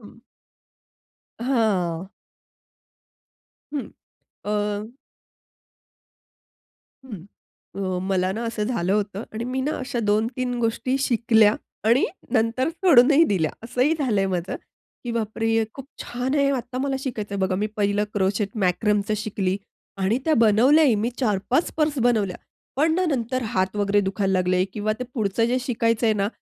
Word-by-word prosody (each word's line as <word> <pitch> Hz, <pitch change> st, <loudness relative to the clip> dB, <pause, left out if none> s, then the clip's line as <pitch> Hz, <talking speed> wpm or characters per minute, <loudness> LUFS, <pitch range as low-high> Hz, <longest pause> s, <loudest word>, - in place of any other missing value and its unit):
हं. -, -, -15 dB, 1.2 s
हां. 195 Hz, -9 st, 0 dB, 1.6 s
हं, 290 Hz, -3 st, -3 dB, 0.6 s
अ -, -, -1 dB, 2.6 s
हं. 205 Hz, -9 st, -8 dB, 0.5 s
अ, 185 Hz, -2 st, -2 dB
मला 185 Hz, -1 st, +1 dB
ना, 225 Hz, +4 st, -4 dB
असं 230 Hz, -2 st, -3 dB
झालं 210 Hz, -6 st, -1 dB
होतं 205 Hz, 0 st, -1 dB
आणि 220 Hz, +2 st, -4 dB
मी 255 Hz, +2 st, -2 dB
ना, 290 Hz, +4 st, -1 dB
अशा 255 Hz, -2 st, -4 dB
2-3 245 Hz, +4 st, 0 dB
गोष्टी 240 Hz, +3 st, 0 dB
शिकल्या 225 Hz, -5 st, +4 dB, 0.3 s
आणि 240 Hz, +5 st, +4 dB, 0.3 s
नंतर 230 Hz, +4 st, +1 dB
सोडूनही 320 Hz, -3 st, +5 dB
दिल्या 160 Hz, -5 st, +1 dB
असंही 250 Hz, +6 st, +1 dB
झालंय 215 Hz, -9 st, +1 dB
माझं. 180 Hz, -1 st, -2 dB, 0.5 s
की 240 Hz, -, -3 dB
"बापरे! 225 Hz, 0 st, -2 dB
हे 225 Hz, 0 st, +2 dB
खूप 270 Hz, -1 st, -9 dB, 0.2 s
छान 250 Hz, +3 st, -3 dB
आहे, 280 Hz, -1 st, +3 dB
आत्ता 255 Hz, -1 st, -3 dB
मला 270 Hz, 0 st, -1 dB
शिकायचंय." 220 Hz, -7 st, -4 dB
बघा, 190 Hz, -1 st, 0 dB
मी -, -, +2 dB
पहिलं 205 Hz, 0 st, +1 dB
क्रोचेट 200 Hz, +1 st, +1 dB, 0.2 s
मॅकरमचं 205 Hz, +3 st, +1 dB
शिकली 200 Hz, -3 st, -1 dB, 0.5 s
आणि 210 Hz, +6 st, +2 dB
त्या 315 Hz, -1 st, +3 dB
बनवल्याही. 245 Hz, +6 st, +5 dB
मी 235 Hz, -, 0 dB
4-5 245 Hz, -, 0 dB
पर्स 305 Hz, -2 st, +1 dB
बनवल्या. 210 Hz, -6 st, +1 dB, 0.4 s
पण 315 Hz, +3 st, +3 dB
ना, 370 Hz, +2 st, +1 dB
नंतर 255 Hz, -2 st, -1 dB
हात 190 Hz, +2 st, 0 dB
वगैरे 205 Hz, 0 st, +2 dB
दुखायला 195 Hz, 0 st, -1 dB
लागले 185 Hz, 0 st, +2 dB
किंवा 215 Hz, 0 st, -1 dB
ते 250 Hz, -, -3 dB
पुढचं 220 Hz, -2 st, 0 dB
जे 250 Hz, +2 st, +1 dB
शिकायचंय 230 Hz, -2 st, +1 dB
ना, 200 Hz, -1 st, 0 dB
225 Hz, 135 wpm, -23 LUFS, 200-255 Hz, 2.6 s, सोडूनही